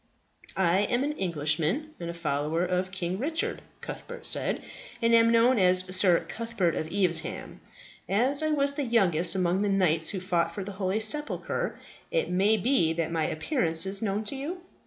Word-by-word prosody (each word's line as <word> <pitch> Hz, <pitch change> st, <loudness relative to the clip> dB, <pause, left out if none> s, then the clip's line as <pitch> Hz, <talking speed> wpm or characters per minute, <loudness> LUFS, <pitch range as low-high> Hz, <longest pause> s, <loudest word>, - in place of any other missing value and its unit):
"I 185 Hz, -1 st, +3 dB
am 245 Hz, +2 st, +1 dB
an 290 Hz, -, -1 dB
Englishman, 175 Hz, -, -1 dB
and 170 Hz, -1 st, -5 dB
a 170 Hz, -, -6 dB
follower 155 Hz, +1 st, -1 dB
of 180 Hz, +1 st, -1 dB
King 185 Hz, 0 st, -3 dB
Richard," 320 Hz, +6 st, -2 dB, 0.2 s
Cuthbert 475 Hz, -1 st, -8 dB
said, -, -, -1 dB, 0.4 s
"and 230 Hz, -1 st, +2 dB
am 230 Hz, 0 st, +6 dB
known 235 Hz, +1 st, +4 dB
as 185 Hz, 0 st, +3 dB
Sir 185 Hz, -2 st, +3 dB
Cuthbert 225 Hz, -7 st, -2 dB
of 155 Hz, -, -3 dB
Evesham. 180 Hz, -4 st, -1 dB, 0.5 s
As 255 Hz, +9 st, +3 dB
I 310 Hz, -, 0 dB
was 280 Hz, -2 st, +2 dB
the 285 Hz, -, -3 dB
youngest 180 Hz, -, +2 dB
among 185 Hz, 0 st, +1 dB
the 205 Hz, -, 0 dB
knights 170 Hz, -5 st, +1 dB
who 195 Hz, -, -3 dB
fought 170 Hz, -2 st, -1 dB
for 200 Hz, -, -4 dB
the 200 Hz, -, -7 dB
holy 190 Hz, +2 st, -2 dB
sepulchre, 300 Hz, -, 0 dB, 0.3 s
it -, -, -1 dB
may 200 Hz, +4 st, +3 dB
be 210 Hz, -7 st, +1 dB
that 165 Hz, -1 st, -2 dB
my 160 Hz, -2 st, 0 dB
appearance 165 Hz, -, +1 dB
is 195 Hz, +1 st, -1 dB
known 210 Hz, 0 st, -1 dB
to 215 Hz, -, -5 dB
you?" 320 Hz, +7 st, -5 dB
195 Hz, 180 wpm, -27 LUFS, 170-240 Hz, 0.5 s, am